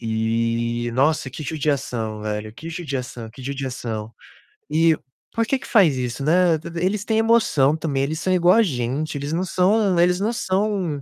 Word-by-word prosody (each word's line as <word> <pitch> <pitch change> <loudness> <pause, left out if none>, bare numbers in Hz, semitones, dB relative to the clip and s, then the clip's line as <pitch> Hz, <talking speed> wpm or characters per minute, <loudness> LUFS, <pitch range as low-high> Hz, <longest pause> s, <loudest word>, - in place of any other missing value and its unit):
E, 115 +1 -1
nossa, 145 +1 +2
que 155 - -8
judiação, 130 -7 -2
velho, 105 0 -4
que 160 +7 -9
judiação 130 -8 -5
que 130 - -12
judiação. 125 -5 -4 0.6
E 165 0 +4 0.4
por 230 -1 0
que 270 - +1
que - - -11
faz 185 - +4
isso, 125 +2 -3
né. 170 +2 +4 0.3
E - - +2
eles 205 +2 0
têm 220 - +1
emoção 220 -11 +3
também, 145 -4 -1
eles 155 +3 -2
são 185 - -1
igual 180 0 +5
a 230 - +5
gente, 145 - -2
eles 145 +2 -4
não 175 +3 0
são 190 +1 +2
eles 180 +1 +3
não 210 +3 0
são 190 -7 -1
150 Hz, 175 wpm, -22 LUFS, 120-180 Hz, 0.6 s, igual